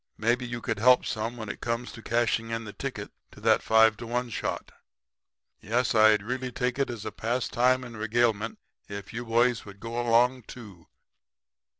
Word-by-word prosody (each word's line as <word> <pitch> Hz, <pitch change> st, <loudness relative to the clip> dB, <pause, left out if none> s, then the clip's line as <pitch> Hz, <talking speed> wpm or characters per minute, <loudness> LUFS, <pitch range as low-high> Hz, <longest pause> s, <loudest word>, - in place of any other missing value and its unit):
Maybe 120 Hz, +3 st, +1 dB
you 120 Hz, 0 st, -5 dB
could 115 Hz, -4 st, -2 dB
help 125 Hz, +3 st, +5 dB
some 115 Hz, +2 st, -3 dB
when 110 Hz, -2 st, -6 dB
it 105 Hz, -, -6 dB
comes 120 Hz, +1 st, -2 dB
to 115 Hz, -, -11 dB
cashing 115 Hz, 0 st, 0 dB
in 115 Hz, 0 st, -3 dB
the 105 Hz, -2 st, -9 dB
ticket -, -, -6 dB, 0.2 s
to -, -, -14 dB
that -, -, +4 dB
5 110 Hz, -1 st, +4 dB
to 115 Hz, -, -8 dB
1 120 Hz, +1 st, -2 dB
shot. -, -, -4 dB, 0.9 s
Yes, 120 Hz, +4 st, 0 dB
I'd 110 Hz, -2 st, +5 dB
really 130 Hz, +3 st, -3 dB
take 125 Hz, +2 st, -2 dB
it 140 Hz, -, +1 dB
as 115 Hz, -4 st, -6 dB
a -, -, -3 dB
pastime 125 Hz, +2 st, +1 dB
and 120 Hz, -2 st, -9 dB
regalement 110 Hz, 0 st, 0 dB, 0.3 s
if 100 Hz, +1 st, -7 dB
you 120 Hz, +2 st, -4 dB
boys 120 Hz, +1 st, +2 dB
would 100 Hz, -1 st, -12 dB
go 115 Hz, +2 st, -3 dB
along 120 Hz, +1 st, +3 dB
too.' 100 Hz, -9 st, -12 dB
115 Hz, 185 wpm, -27 LUFS, 110-125 Hz, 0.9 s, help